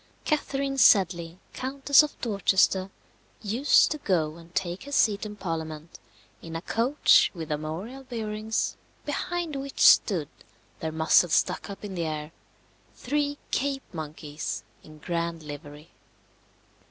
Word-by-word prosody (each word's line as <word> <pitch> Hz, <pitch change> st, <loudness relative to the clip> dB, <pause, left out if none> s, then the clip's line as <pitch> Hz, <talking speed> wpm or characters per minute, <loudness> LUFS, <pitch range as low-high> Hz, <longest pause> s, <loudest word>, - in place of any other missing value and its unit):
Catherine 275 Hz, -3 st, -1 dB
Sedley, 175 Hz, -6 st, +4 dB, 0.2 s
Countess 270 Hz, +2 st, +4 dB
of 300 Hz, -1 st, -5 dB
Dorchester, 195 Hz, -3 st, +2 dB, 0.5 s
used 235 Hz, +8 st, +4 dB
to 305 Hz, -, -2 dB
go 165 Hz, -, 0 dB
and 165 Hz, 0 st, -15 dB
take 185 Hz, +3 st, -2 dB
her 285 Hz, -, -9 dB
seat 215 Hz, -6 st, +2 dB
in 210 Hz, -, -8 dB
Parliament 160 Hz, -4 st, -6 dB, 0.4 s
in 165 Hz, -1 st, -8 dB
a 165 Hz, -, -3 dB
coach 245 Hz, +9 st, +4 dB
with 160 Hz, -2 st, -6 dB
armorial 160 Hz, -, -4 dB
bearings, 220 Hz, -3 st, -3 dB, 0.3 s
behind 345 Hz, +1 st, -3 dB
which 275 Hz, 0 st, -6 dB
stood, 170 Hz, -9 st, +5 dB, 0.5 s
their 160 Hz, -, -3 dB
muzzles 160 Hz, +1 st, +3 dB
stuck -, -, 0 dB
up 200 Hz, +1 st, -8 dB
in 200 Hz, -, -6 dB
the 170 Hz, -2 st, -2 dB
air, 155 Hz, 0 st, -5 dB, 0.6 s
three 290 Hz, +2 st, -1 dB
Cape 275 Hz, 0 st, -1 dB
monkeys 155 Hz, -1 st, -5 dB, 0.2 s
in 155 Hz, 0 st, -14 dB
grand 170 Hz, 0 st, -3 dB
livery. 145 Hz, +1 st, -10 dB
190 Hz, 130 wpm, -27 LUFS, 160-265 Hz, 0.6 s, stood